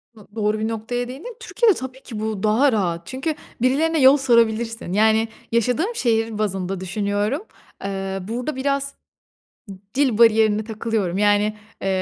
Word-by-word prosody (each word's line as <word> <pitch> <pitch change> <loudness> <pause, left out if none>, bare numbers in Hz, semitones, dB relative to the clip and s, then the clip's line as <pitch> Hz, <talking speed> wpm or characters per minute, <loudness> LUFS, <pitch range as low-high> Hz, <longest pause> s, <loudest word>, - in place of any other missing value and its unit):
Do 215 -2 -16
doğru 215 -1 0
bir 220 - -1
noktaya 230 +2 -3
değindin. 300 - -8
Türkiye'de 465 -2 +2
tabii 260 0 -7
ki 220 -4 -7
bu 215 -2 -3
daha 235 +7 +4
rahat. 175 -6 -1
Çünkü 270 +4 -3 0.3
birilerine 310 +5 +2
yol 265 +2 +7
sorabilirsin. 230 -6 +1
Yani, 220 +2 +3 0.2
yaşadığım 250 - +1
şehir 225 - 0
bazında 195 -3 -2
düşünüyorum. 205 - -1 0.4
Eee, 195 -1 -3
burada 250 +6 -3
biraz 275 +1 -1 0.8
d 195 - -7 0.2
dil 260 -5 +2
bariyerine 220 -2 +4
takılıyorum. 215 -4 -2
Yani, 210 +1 +2 0.3
eee, 195 - -1
225 Hz, 145 wpm, -22 LUFS, 210-260 Hz, 0.8 s, yol